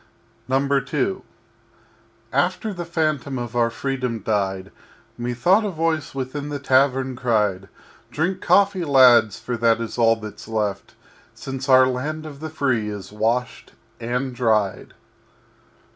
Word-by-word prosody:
II 140 Hz, +6 st, 0 dB, 1.1 s
After 220 Hz, -3 st, 0 dB
the 175 Hz, -2 st, -5 dB
phantom 155 Hz, -5 st, -1 dB
of 120 Hz, -1 st, -5 dB
our 120 Hz, -1 st, +2 dB
Freedom 125 Hz, -1 st, -3 dB
died 100 Hz, -2 st, -2 dB, 0.4 s
Methought 125 Hz, -, +2 dB
a 210 Hz, -, -1 dB
Voice 160 Hz, -4 st, -2 dB
within 135 Hz, +2 st, -4 dB
the 145 Hz, -, -3 dB
Tavern 130 Hz, -1 st, +2 dB
cried: 105 Hz, -6 st, 0 dB, 0.4 s
"Drink 180 Hz, +8 st, -2 dB
coffee, 200 Hz, -2 st, +3 dB
Lads, 125 Hz, -, +5 dB
for 125 Hz, -, -4 dB
that 115 Hz, 0 st, +3 dB
is 115 Hz, +1 st, -5 dB
all 115 Hz, -1 st, +5 dB
that's 110 Hz, -2 st, -10 dB
left 105 Hz, -3 st, -3 dB, 0.4 s
Since 135 Hz, 0 st, -6 dB
our 130 Hz, 0 st, +7 dB
Land 145 Hz, +5 st, -3 dB
of 145 Hz, -3 st, -9 dB
the 160 Hz, +1 st, -6 dB
Free 130 Hz, -8 st, -1 dB
is 100 Hz, -2 st, -7 dB
washed 115 Hz, +4 st, -2 dB, 0.3 s
and 125 Hz, +3 st, -2 dB
dried." 110 Hz, -5 st, 0 dB
130 Hz, 130 wpm, -22 LUFS, 115-145 Hz, 1.1 s, our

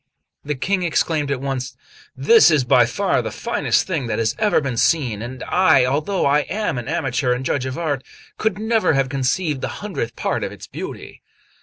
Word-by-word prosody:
The 150 Hz, 0 st, -3 dB
King 185 Hz, +8 st, -1 dB
exclaimed 155 Hz, -3 st, 0 dB
at 135 Hz, -2 st, -2 dB
once: 130 Hz, -2 st, -4 dB, 0.4 s
"This 455 Hz, -1 st, +6 dB
is 150 Hz, -4 st, +3 dB
by 125 Hz, -, +4 dB
far -, -, 0 dB
the -, -, -4 dB
finest -, -, 0 dB
thing 160 Hz, -10 st, -2 dB
that 110 Hz, -2 st, -2 dB
has 115 Hz, -1 st, 0 dB
ever 215 Hz, -1 st, +3 dB
been 135 Hz, -5 st, -3 dB
seen; 120 Hz, -5 st, +1 dB
and 125 Hz, +2 st, -7 dB
I, 185 Hz, -8 st, +4 dB
although 150 Hz, +9 st, 0 dB
I 140 Hz, +1 st, +4 dB
am 205 Hz, -, -1 dB
an 120 Hz, -, -8 dB
amateur 125 Hz, -1 st, 0 dB
and 125 Hz, +2 st, -4 dB
judge 130 Hz, -1 st, -1 dB
of 130 Hz, -, -5 dB
art, 145 Hz, -6 st, -2 dB, 0.4 s
could 215 Hz, -3 st, 0 dB
never 220 Hz, -3 st, +1 dB
have 135 Hz, -1 st, +1 dB
conceived 140 Hz, +2 st, -1 dB
the -, -, -2 dB, 0.2 s
hundredth 120 Hz, -, -4 dB
part -, -, -2 dB
of -, -, -3 dB
its -, -, -10 dB
beauty." -, -, -8 dB
140 Hz, 195 wpm, -21 LUFS, 125-175 Hz, 0.4 s, This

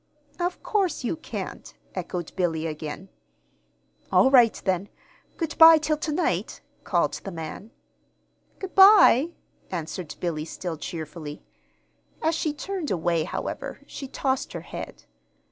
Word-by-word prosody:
"Of 355 Hz, +1 st, -2 dB
course 385 Hz, -9 st, 0 dB
you 245 Hz, -, -1 dB
can't," 315 Hz, -, -7 dB, 0.2 s
echoed 175 Hz, -2 st, -5 dB
Billy, 165 Hz, -4 st, 0 dB
again. 155 Hz, +4 st, -6 dB, 1.0 s
"All 265 Hz, -, +5 dB
right 240 Hz, -5 st, +6 dB
then. 190 Hz, +1 st, 0 dB, 0.5 s
Good 325 Hz, -2 st, -3 dB
by 325 Hz, 0 st, +10 dB
till 310 Hz, 0 st, 0 dB
to 305 Hz, +1 st, -3 dB
night," 330 Hz, +4 st, -1 dB, 0.2 s
called -, -, +1 dB
the -, -, -5 dB
man. 165 Hz, +4 st, -7 dB, 0.9 s
"Good 385 Hz, -1 st, -7 dB
by," 385 Hz, -, +7 dB, 0.4 s
answered 170 Hz, -1 st, -5 dB
Billy, 155 Hz, -3 st, -2 dB
still 170 Hz, 0 st, -5 dB
cheerfully. 155 Hz, -1 st, -7 dB, 0.8 s
As 320 Hz, +1 st, +1 dB
she 315 Hz, -1 st, 0 dB
turned 360 Hz, +2 st, -4 dB
away, 170 Hz, -3 st, 0 dB
however, -, -, -5 dB
she 275 Hz, -, -7 dB
tossed 265 Hz, 0 st, -2 dB
her -, -, -5 dB
head. -, -, -8 dB
205 Hz, 130 wpm, -25 LUFS, -, 1.0 s, by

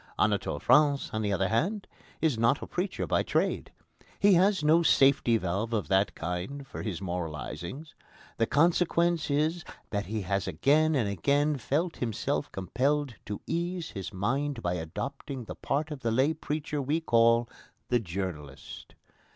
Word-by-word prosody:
Anatole -, -, +1 dB
France, 145 Hz, -2 st, +3 dB
on 110 Hz, -, -1 dB
the 105 Hz, -1 st, -1 dB
other 95 Hz, -1 st, +1 dB
hand, 190 Hz, -, 0 dB, 0.4 s
is 160 Hz, -5 st, +2 dB
not 115 Hz, +5 st, +2 dB
a -, -, -4 dB
preacher 180 Hz, +2 st, -3 dB
by -, -, +1 dB
trade. -, -, -1 dB, 0.5 s
He 200 Hz, 0 st, +5 dB
has 190 Hz, 0 st, +3 dB
no 160 Hz, +3 st, +5 dB
safety 135 Hz, -7 st, +4 dB
valve 105 Hz, +4 st, -2 dB
of 105 Hz, -3 st, -1 dB
that 95 Hz, +1 st, +2 dB
kind 90 Hz, +12 st, -4 dB
for -, -, -7 dB
his 100 Hz, -3 st, -4 dB
moralisings. 90 Hz, -, -5 dB, 0.4 s
The 115 Hz, -, +2 dB
consequence 170 Hz, +1 st, +2 dB
is 155 Hz, +4 st, +1 dB, 0.3 s
that 100 Hz, -1 st, -2 dB
he 110 Hz, +1 st, -2 dB
has 100 Hz, +1 st, -1 dB
again 150 Hz, -, +3 dB
and 120 Hz, -7 st, +1 dB
again 140 Hz, -, +1 dB
felt 155 Hz, +7 st, -1 dB
himself 115 Hz, -4 st, -2 dB
compelled 135 Hz, -, 0 dB
to 105 Hz, 0 st, -5 dB
ease 170 Hz, 0 st, -3 dB
his 95 Hz, -3 st, -6 dB
mind 130 Hz, +7 st, -2 dB
by 90 Hz, -, 0 dB
adopting 130 Hz, -, -5 dB
the -, -, -6 dB
part 150 Hz, +3 st, -2 dB
of 150 Hz, -, -5 dB
the 115 Hz, -, -1 dB
lay 130 Hz, +7 st, +2 dB
preacher 150 Hz, -1 st, -3 dB
we 145 Hz, +5 st, 0 dB
call 115 Hz, -5 st, +3 dB, 0.4 s
the 120 Hz, -, +3 dB
journalist. 85 Hz, -8 st, -6 dB
130 Hz, 160 wpm, -29 LUFS, 100-155 Hz, 0.5 s, He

